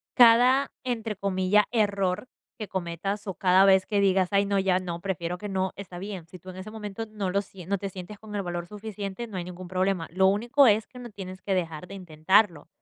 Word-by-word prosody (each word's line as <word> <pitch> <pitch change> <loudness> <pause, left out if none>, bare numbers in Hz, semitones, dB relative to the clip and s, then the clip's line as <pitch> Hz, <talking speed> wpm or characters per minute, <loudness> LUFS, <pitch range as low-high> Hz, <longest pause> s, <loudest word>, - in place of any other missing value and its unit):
cada, 245 +3 +6
entre 225 -4 -2
comilla, 195 +1 +2
error 200 -1 0 0.3
que 215 - -5
cometas, 190 +3 -4
o 190 - -3
cada 185 +2 +5
vez 190 -1 +5
que 205 -2 0
digas: 190 -2 +3
"Ay, 200 0 +3
no, 200 0 +1
ya 190 -1 +2
no, 175 -2 -5
prefiero 180 -2 -3
que 210 - -6
no", 190 0 -1
está 180 -3 -8
bien. 195 -3 -6
Si 180 +1 -12
tú 185 - -12
en 185 - -9
ese 195 +3 -8
momento 220 0 -6
no 210 -3 -4
lo 200 +2 +1
sie 185 -2 -13
no 200 +1 +1
te 195 +1 -4
sientes 185 +2 -9
con 210 0 -9
el 205 - 0
valor 175 -1 -4
suficiente, 210 +2 -6
no 195 -4 -7
hay 175 - -2
ningún 180 0 -8
problema. 185 -1 0
Lo 190 +2 +4
único 240 +8 +4
es 215 0 +3
que 255 - -15
no 240 -1 -8
tienes 185 -2 -8
que 195 - -1
dejar 165 -1 -3
de 195 - -9
intentarlo, 180 0 +2
195 Hz, 230 wpm, -27 LUFS, 185-210 Hz, 0.3 s, cada